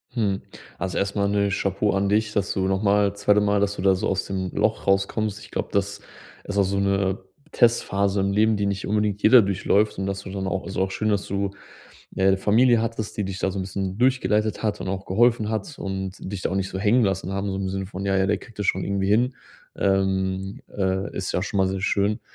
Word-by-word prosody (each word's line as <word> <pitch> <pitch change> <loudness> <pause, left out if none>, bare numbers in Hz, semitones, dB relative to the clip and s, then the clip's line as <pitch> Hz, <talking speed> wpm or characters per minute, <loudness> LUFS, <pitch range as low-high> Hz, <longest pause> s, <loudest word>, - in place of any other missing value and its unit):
Mhm. 100 -5 0 0.4
Also, 95 0 -3
erst 100 0 -1
mal 100 -1 +1
'ne 100 0 +1
Chapeau 100 +1 0
an 100 0 +1
dich, 105 +1 +1
dass 100 -1 0
du 95 -1 0
noch 95 +1 0
mal 100 -1 +3
2. 100 +1 +3
Mal, 100 0 +2
dass 100 0 0
du - - -4
da 95 -1 +4
so 90 - -2
aus - - -1
dem 95 -2 -3
Loch 110 0 0
rauskommst. 100 +2 +1
Ich 105 -1 -14
glaube, - - -3
das 100 0 -1 0.4
ist 100 - -5
auch 100 - +5
so 100 +1 -1
'ne 100 -1 +1 0.4
Testphase 100 -4 +2
im 100 0 0
Leben, 110 +1 +3
die 100 - 0
nicht 100 0 -2
unbedingt 105 -1 0
jeder 120 +3 +8
durchläuft, 100 +1 +1
und 95 - -2
dass 100 0 -3
du - - -8
dann 95 -1 -3
auch 95 0 -2
also, 95 -1 -3
auch 95 - 0
schön, 110 +3 -1
dass 100 -2 0
du 100 0 -2 0.6
'ne 95 0 +3
Familie 115 +4 +4
hattest, 115 -2 -3
die 105 - 0
dich 95 0 -5
da 95 - 0
so 95 - -5
'n 95 - -1
bisschen 95 0 -4
durchgeleitet 110 -5 +1
hat 105 -2 -1
und - - -4
auch 95 0 -3
geholfen 110 +2 +2
hat 110 +7 -4
und 95 -1 -4
dich 95 0 -5
da - - -1
auch - - -2
nicht 95 -1 -1
so 95 - -4
hängen 110 +5 +3
lassen 95 -1 -1
haben, 100 +1 -2
so 95 - -3
im 95 -1 -2
Sinne 95 0 -3
von: 95 0 -6
„Ja, 95 - +2
ja, 95 0 +2
der 105 +1 +1
kriegt 115 -1 -16
das 105 - -1
schon - - +1
irgendwie 100 -1 -1
hin.“ 120 +5 +2 0.4
Ähm, 95 0 0
äh, 95 0 -1
ist 95 - -2
ja 90 - 0
schon 105 0 -2
mal 95 - +4
sehr 95 0 -2
schön 100 +2 +1
100 Hz, 245 wpm, -24 LUFS, 95-105 Hz, 0.6 s, jeder